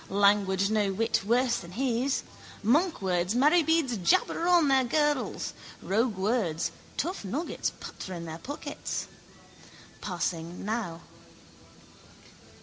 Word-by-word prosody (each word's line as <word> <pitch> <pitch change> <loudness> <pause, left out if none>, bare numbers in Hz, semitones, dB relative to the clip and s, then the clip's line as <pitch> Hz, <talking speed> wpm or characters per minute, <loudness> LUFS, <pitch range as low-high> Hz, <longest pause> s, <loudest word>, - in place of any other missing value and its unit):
Language 200 0 +3
no 210 -2 +2
whit 225 +4 +1
worse 240 +3 +2
than 170 +1 -9
his. 255 +3 0 0.4
Monkwords, 205 - +2
marybeads 310 -2 +3
jabber 330 - +2
on 350 -4 +5
their 270 -1 +4
girdles: 295 +2 0 0.3
roguewords, 200 -6 0 0.3
tough 355 - -2
nuggets 275 - -2
patter 185 - -7
in 170 -1 -6
their 160 0 -7
pockets. 285 - -5 1.0
Passing 175 -1 -3
now. 210 -6 -3
220 Hz, 100 wpm, -28 LUFS, 190-270 Hz, 1.0 s, on